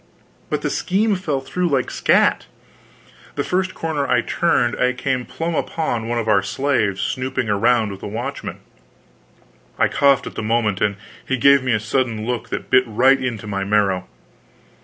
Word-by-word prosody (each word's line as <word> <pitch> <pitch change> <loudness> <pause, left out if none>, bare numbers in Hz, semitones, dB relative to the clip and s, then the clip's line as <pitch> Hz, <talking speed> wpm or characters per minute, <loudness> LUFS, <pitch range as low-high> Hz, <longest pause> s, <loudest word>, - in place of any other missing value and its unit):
But - - -2
the - - -1
scheme 205 +3 +1
fell 155 -8 -2
through 180 +6 -2
like 135 -5 0
scat! - - +2 0.9
The - - -1
first 185 +1 -1
corner 155 -4 -2
I 125 -1 +3
turned, 120 -5 +1
I 125 0 +2
came 125 0 -2
plump 165 0 -3
upon 120 -11 -2
one 120 0 -1
of 115 -1 -2
our 100 -2 +4
slaves, 110 -2 0
snooping 130 -2 -2
around 110 +1 +2
with 95 - -9
a - - -5
watchman. 120 +7 -5 1.2
I - - +3
coughed 140 -1 +3
at - - -7
the - - -4
moment, 110 -3 0
and 100 -1 +1 0.3
he 130 - -1
gave 140 +2 +5
me 130 -1 0
a 110 - +2
sudden 115 -1 -1
look 120 -1 -3
that - - -5
bit 130 - +6
right 130 +5 +3
into 115 -5 -3
my 100 -2 -3
marrow. 100 -3 +1
125 Hz, 175 wpm, -20 LUFS, 110-140 Hz, 1.2 s, bit